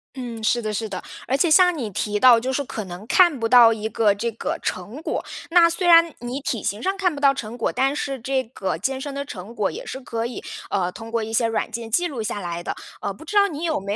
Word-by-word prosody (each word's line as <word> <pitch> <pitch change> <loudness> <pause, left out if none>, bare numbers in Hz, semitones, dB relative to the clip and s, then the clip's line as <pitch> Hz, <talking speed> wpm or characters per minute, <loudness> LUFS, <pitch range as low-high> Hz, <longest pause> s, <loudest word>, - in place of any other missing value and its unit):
嗯， 240 -4 -6
是 240 +2 +2
的 215 -1 -3
是 220 +2 -2
的。 185 -3 -5 0.3
而 265 - +1
且 310 +5 +2
像 360 +2 +6
你 245 -8 -4
提 210 +2 -2
到 240 0 +7
就 260 +3 -3
是 285 - 0
可 225 -5 -5
能 180 +2 -9
看 345 -4 +4
不 225 0 -1
到 235 -2 +8
一 220 0 -4
个 215 -2 +3
这 230 +4 -3
个 225 - -3
成 205 - -4
果， - - -3 0.2
那 340 0 +6
虽 350 +2 -1
然 335 -2 +7
你 245 +3 -4
体 235 -6 -3
型 205 +3 -2
上 385 +1 0
看 370 -4 +1
不 - - -6
到 280 -1 +5
成 235 -3 -6
果， 230 - 0
但 270 +2 +1
是 275 -2 -3
这 260 +2 -1
个 220 -7 -4
健 265 +9 -2
身 285 0 -5
的 280 0 -3
成 205 -2 -9
果 210 - 0
也 475 - -7
是 265 - -6
可 230 -3 -4
以， 245 - -7 0.3
呃， 180 -2 0
通 225 +4 -9
过 230 -1 -1
一 220 +1 -6
些 230 0 +2
软 225 -1 -2
件 230 0 -5
记 350 +11 +2
录 270 -8 -5
下 210 -1 -3
来 175 -2 -4
的。 - - -3 0.3
呃， 200 - -2
不 260 - -14
知 415 - -6
道 400 -1 +6
你 310 -3 -6
有 325 -3 0
没 200 +1 -3
240 Hz, 290 characters per minute, -23 LUFS, 215-285 Hz, 0.3 s, 到